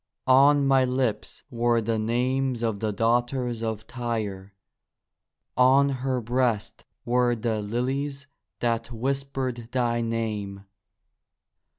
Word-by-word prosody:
On 140 +2 +5
my 135 -1 +4
lips 125 -4 -2
were 120 -1 +2
the 115 0 -1
names 125 +2 0
of 110 -3 -1
the 110 0 -1
daughters 120 +2 0
of 110 -1 -3
Tyre, 105 -6 -4 1.0
On 135 +2 +5
her 130 -1 -1
breast 120 -2 -1 0.2
were 120 0 +2
the 110 -1 -2
lilies 135 +6 -2 0.4
that 115 -1 0
whispered 130 -1 -3
thy 120 -2 0
name. 105 -4 -3
120 Hz, 105 wpm, -26 LUFS, 115-130 Hz, 1.0 s, On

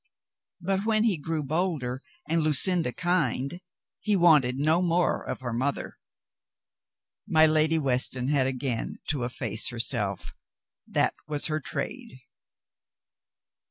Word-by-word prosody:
But 190 +2 -1
when 215 0 +2
he 225 -5 +2
grew 155 0 -3
bolder 145 -5 -2 0.3
and 165 0 +1
Lu 155 -1 +2
cinda 175 -3 +3
kind, 175 -2 -1 0.4
he 210 -1 0
wanted 150 -8 +4
no 155 +5 +3
more 175 -1 +1
of - - -6
her 120 -3 -4
mother. 130 +4 -3 1.3
My 160 0 +5
Lady 155 +1 +3
Weston 130 -3 +1
had 140 -3 +2
again 130 -2 -2
to 145 -5 -1
efface 115 -3 -2
herself. 115 -5 -2 0.5
That - - +1
was 150 -1 -1
her 155 -1 -1
trade. 235 - -6
155 Hz, 125 wpm, -27 LUFS, 130-175 Hz, 1.3 s, My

